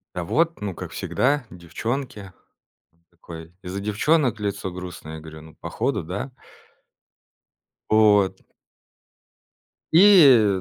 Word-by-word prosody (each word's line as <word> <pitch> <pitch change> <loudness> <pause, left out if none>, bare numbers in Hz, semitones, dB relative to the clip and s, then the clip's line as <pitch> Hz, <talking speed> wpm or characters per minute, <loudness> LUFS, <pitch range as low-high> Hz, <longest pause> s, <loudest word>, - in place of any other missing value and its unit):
"Да 90 - -3
вот, 165 - 0
ну 100 -3 -4
как - - -8
всегда, 140 0 -1
девчонки". 105 - -6 0.6
Он 85 0 -38
такой: 85 -1 -12
"Из-за 95 +2 -6
девчонок 115 +4 0
лицо 100 -2 -4
грустное?" 90 -3 -9
Я - - -8
говорю: 80 0 -11
"Ну, 80 -1 -16
походу, - - -3
да". 100 - -6 1.6
Вот. 105 -3 +3 1.5
И, 140 - +6
100 Hz, 110 wpm, -23 LUFS, 90-130 Hz, 1.6 s, И